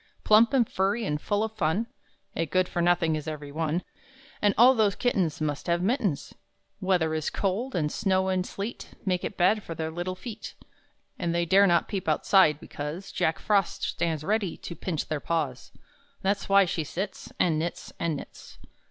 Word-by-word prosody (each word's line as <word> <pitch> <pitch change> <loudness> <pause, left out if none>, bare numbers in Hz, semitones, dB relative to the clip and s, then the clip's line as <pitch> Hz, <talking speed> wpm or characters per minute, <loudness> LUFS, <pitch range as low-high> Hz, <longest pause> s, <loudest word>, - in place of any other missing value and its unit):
Plump 220 +3 +6
and 255 -5 +3
furry 200 +4 0
and 150 -4 -2
full 205 0 0
of 220 - -2
fun, 180 +4 +1 0.5
(A 165 - -1
good 185 +4 +2
for 175 - -2
nothing 170 -2 +3
is 155 0 -5
every 150 -2 -6
one.) 160 +3 -1 0.6
And 205 -1 +3
all 250 +3 +8
those 215 -5 +2
kittens 190 - 0
Must 150 0 -2
have 170 +1 +1
mittens! 205 - 0 0.5
Weather 180 -4 +1
is 155 -1 -1
cold; 210 +7 -2
and 150 -3 0
snow 190 -1 +1
and 185 -1 +1
sleet 200 +5 -6
Make 180 -2 0
it - - -4
bad 190 +4 +3
for 165 - -7
their 160 0 -3
little 175 +2 -3
feet; 220 +3 -8 0.6
And 170 0 -1
they 170 0 +1
dare 195 +4 +5
not 170 -1 +3
peep 190 -4 -4
outside, 155 -1 +4
because 150 +8 -6
Jack 160 - 0
Frost 200 -3 0
stands 160 -3 -1
ready 200 -1 0
to 170 - -8
pinch 160 -1 -3
their 155 - -2
paws 145 -6 -2 0.5
That's 195 +1 0
why 195 0 +6
she 165 -2 -2
sits, 190 +6 -5
And 160 -3 +2
knits, 170 +2 -4
and 170 -2 0
knits. - - -10
180 Hz, 185 wpm, -27 LUFS, 160-200 Hz, 0.6 s, all